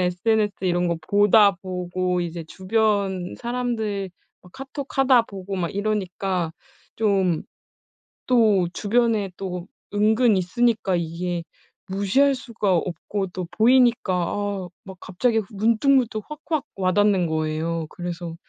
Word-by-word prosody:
SNS 205 +4 +1
이런 175 -1 +1
거 170 - 0
보다 205 0 +5
보고 180 0 -2
이제 170 -1 -4
주변 195 0 0
사람들 230 -5 -2 0.4
카톡하다 270 -2 +1
보고 195 -3 -7
막 175 -2 -1
이러니까 190 -4 -1 0.4
좀 195 -6 +1 0.9
또 215 -7 +4
주변에 220 -2 +1
또 180 -2 -5 0.3
은근 215 +2 +3
있으니까 195 +1 +1
이게 170 +1 -3 0.4
무시할 205 +9 +2
수가 225 -7 -1
없고 185 +3 -2
또 180 -1 -6
보이니까 240 -3 +4
아 195 +2 -2 0.2
막 190 -1 -11
갑자기 225 +5 0
문득문득 230 +2 +2
확확 300 -1 -3
와 185 -1 +1
닿는 200 -3 +3
거예요. 160 +1 -2
그래서 175 -2 -6
195 Hz, 240 characters per minute, -23 LUFS, 180-225 Hz, 0.9 s, 보다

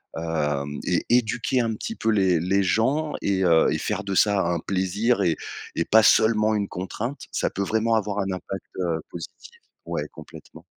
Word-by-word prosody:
hem, 75 -3 -2
et - - 0
éduquer 120 +1 +2
un 115 -2 0
petit 225 - -5
peu 110 - -1
les 95 -6 +3
les 95 +3 +1
gens 135 +11 +1
et 95 -1 +1
heu, 80 -2 +5
et - - 0
faire 100 - -2
de 100 -1 -2
ça 100 -1 +4
un 85 -1 0
plaisir 100 +5 0
et 85 -4 +2 0.4
et 85 - +1
pas 110 +1 +6
seulement 110 0 +4
une 100 -1 -1
contrainte, 115 +9 -5
ça - - 0
peut 100 - -2
vraiment 110 +2 +1
avoir 105 -1 -1
un 95 -1 -1
impact, 95 +1 -6
heu, 85 -3 0
positif. 85 - -9 0.3
Ouais, - - -3
complètement. - - -13
100 Hz, 185 wpm, -24 LUFS, 90-110 Hz, 0.4 s, pas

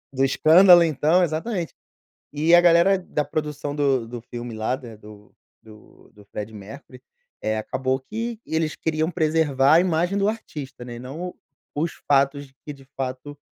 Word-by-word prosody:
Do 135 - +1
escândalo 175 +6 +6
então, 160 +3 +2
exatamente. 170 +2 -3 0.6
E 155 +3 +3
a 175 - +8
galera 175 +3 +5
da 175 -4 -3
produção 145 -1 -4
do 135 -5 +1
do 120 0 -7
filme 120 0 -8
lá, 110 +4 -2
né, 115 -4 -11
do 105 -1 -15 0.3
do 110 -1 -18
do 105 -1 -17
Freddie 105 +1 -7
Mercury, 125 +5 -12 0.4
eh, 110 0 -1
acabou 130 +4 -2
que 225 - -5
eles 160 -1 -1
queriam 160 +1 -1
preservar 155 -4 +2
a 165 - +6
imagem 175 +1 0
do 200 0 +1
artista, 145 - -6
né, 120 - -8
e - - -8
não 155 +9 -7 0.4
os 155 +3 -2
fatos 140 0 +1
que 150 - -5
de 140 -1 -16
fato 135 +2 -5
145 Hz, 165 wpm, -23 LUFS, 130-165 Hz, 0.6 s, a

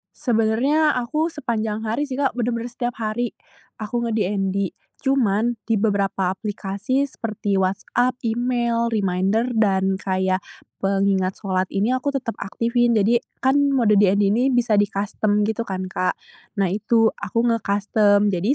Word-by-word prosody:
Sebenarnya 245 +7 +2
aku 310 +7 -1
sepanjang 220 -5 -3
hari 255 +7 0
sih, 275 0 -4
Kak, 270 -3 0
bener-bener 235 0 -1
setiap 245 0 -3
hari. 220 +2 -2 0.5
Aku 235 +3 -2
nge-DND 200 -3 -1 0.3
cuman 240 -4 +1
di 225 - +1
beberapa 200 -3 +1
aplikasi 205 +5 -2
seperti 205 -3 -2
WhatsApp, 205 +6 0
email, 235 0 0
reminder, 205 +2 0
dan 195 -4 +1
kayak 185 0 0 0.4
pengingat 195 -1 +1
shalat 185 -1 0
ini 205 +5 +1
aku 265 +2 -1
tetap 240 -4 -3
aktifin. 235 +3 +1
Jadi 220 +3 +3 0.2
kan 265 +2 +3 0.2
mode 215 -5 +4
DND 200 0 +4
ini 245 +5 +2
bisa 235 -4 +2
di-custom 205 +1 0
gitu 220 +2 -1
kan, 185 -1 -4
Kak. 185 - 0 0.4
Nah, 195 -4 +1
itu, 225 +2 +2
aku 205 +3 -3
nge-custom. 205 -1 +2
Jadi 195 +9 +1
215 Hz, 135 wpm, -22 LUFS, 195-240 Hz, 0.5 s, mode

